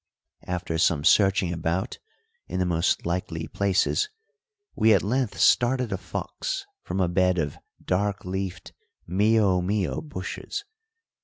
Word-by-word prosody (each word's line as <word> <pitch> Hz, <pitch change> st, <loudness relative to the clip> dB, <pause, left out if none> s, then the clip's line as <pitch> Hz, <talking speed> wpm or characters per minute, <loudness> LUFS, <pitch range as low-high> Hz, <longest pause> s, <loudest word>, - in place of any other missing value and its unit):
After 90 Hz, -2 st, -2 dB
some 80 Hz, -3 st, +3 dB
searching 95 Hz, -1 st, +4 dB
about 85 Hz, +2 st, -2 dB, 0.5 s
in -, -, -4 dB
the 90 Hz, -, +1 dB
most 85 Hz, 0 st, +1 dB
likely 85 Hz, -2 st, -2 dB
places, 100 Hz, -, +1 dB, 0.6 s
we 110 Hz, 0 st, +5 dB
at -, -, +1 dB
length 120 Hz, +2 st, -1 dB
started 125 Hz, -1 st, +3 dB
a 95 Hz, -, 0 dB
fox -, -, -4 dB, 0.2 s
from -, -, -4 dB
a 90 Hz, -, +3 dB
bed 90 Hz, +1 st, +2 dB
of 75 Hz, -4 st, -2 dB, 0.3 s
dark 100 Hz, +2 st, 0 dB
leafed 95 Hz, 0 st, -4 dB, 0.3 s
mio 100 Hz, 0 st, +3 dB
mio 95 Hz, -6 st, -1 dB
bushes. 155 Hz, -, -5 dB
95 Hz, 130 wpm, -26 LUFS, 90-105 Hz, 0.6 s, we